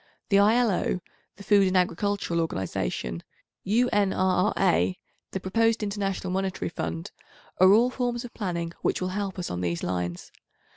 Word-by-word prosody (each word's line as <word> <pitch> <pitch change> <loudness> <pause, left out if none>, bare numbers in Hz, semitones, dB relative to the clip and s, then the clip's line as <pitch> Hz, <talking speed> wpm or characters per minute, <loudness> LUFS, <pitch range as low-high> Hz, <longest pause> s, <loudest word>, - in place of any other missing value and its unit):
The 200 - +5
I.L.O., 210 -3 +3 0.4
the 200 - -12
Food 200 -1 +4
and 185 0 +2
Agricultural 180 -1 0
Organisation, 90 - -3 0.4
U.N.R.R.A., 195 -4 +2 0.3
the 190 - -4
proposed 225 +4 +1
International 195 -2 -2
Monetary 190 - -2
Fund, 80 0 -4 0.5
are 185 +1 +7
all 235 +5 +5
forms 245 -1 -2
of 240 - -10
planning, 170 -4 -3
which - - 0
will 185 - -2
help 195 0 -3
us 180 - -4
on 90 0 -3
these 85 -1 -2
lines. 90 -1 -3
190 Hz, 140 wpm, -26 LUFS, 170-205 Hz, 0.5 s, are